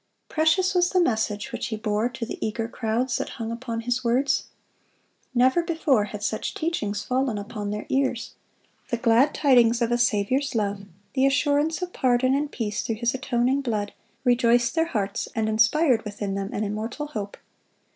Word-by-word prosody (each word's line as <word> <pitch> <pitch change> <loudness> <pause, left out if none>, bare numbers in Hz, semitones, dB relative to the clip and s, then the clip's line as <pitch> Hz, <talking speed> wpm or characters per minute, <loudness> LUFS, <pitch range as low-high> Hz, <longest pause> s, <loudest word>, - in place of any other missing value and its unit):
Precious 320 +4 +2
was 355 -1 +3
the 370 - +2
message 220 - 0
which 240 - -3
he 225 - -3
bore 215 +1 0
to 235 -1 -5
the - - -6
eager 225 +1 -2
crowds 235 +2 -1
that - - -3
hung 225 -1 -4
upon 230 -1 -4
his 245 +2 -1
words. 250 +4 +1 0.9
Never 260 +7 +4
before 320 - +1
had 210 0 -7
such 215 - -2
teachings 215 - -2
fallen 255 -3 0
upon 205 0 -5
their 210 +1 -4
ears. 265 -3 -1 0.6
The 235 - 0
glad 235 +5 +3
tidings 240 -5 +4
of 235 -1 0
a 240 - +2
Saviour's 240 +4 +1
love, 200 -2 -1 0.3
the 270 0 +3
assurance 290 +4 +1
of 360 - -5
pardon 255 0 +2
and 290 +1 0
peace 210 -4 -2
through 225 - -2
His 235 +2 0
atoning 265 0 0
blood, 215 -6 -2 0.3
rejoiced 240 -1 +3
their 325 0 +1
hearts, 205 -9 -2
and 220 -1 0
inspired 225 +5 +3
within 205 -2 -4
them 195 0 -3
an 210 - -2
immortal 215 +7 -3
hope. 210 -9 -6
240 Hz, 175 wpm, -25 LUFS, 215-270 Hz, 0.9 s, Never